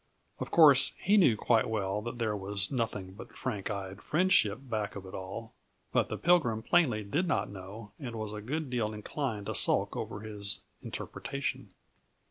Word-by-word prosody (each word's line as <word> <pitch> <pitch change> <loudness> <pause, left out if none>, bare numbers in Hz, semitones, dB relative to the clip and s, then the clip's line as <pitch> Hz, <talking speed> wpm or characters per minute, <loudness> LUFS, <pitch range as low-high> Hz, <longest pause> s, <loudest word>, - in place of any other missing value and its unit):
Of - - -4
course, 145 -5 +7
he 200 +3 +2
knew 165 - +5
quite 115 0 +2
well 105 -2 -1
that 120 +2 -5
there 110 -3 0
was 100 -1 -2
nothing 105 -7 -2
but 100 - -11
frank 105 -7 -3
eyed 100 -1 -5
friendship 155 - +3
back 110 -5 -3
of 100 -1 -7
it 95 - -10
all; 95 +5 -6 0.4
but - - +2
the - - -3
Pilgrim 140 -11 +3
plainly 125 -9 +3
did 150 - 0
not 160 - 0
know 100 +3 -9
and 125 -6 -6
was 110 -1 -4
a 105 - -5
good 145 +5 -3
deal 110 -3 -1
inclined 105 -1 -3
to - - -3
sulk - - +3
over 100 - -4
his 105 -2 -2 0.2
interpretation. 140 0 -5
110 Hz, 175 wpm, -31 LUFS, 100-135 Hz, 0.4 s, course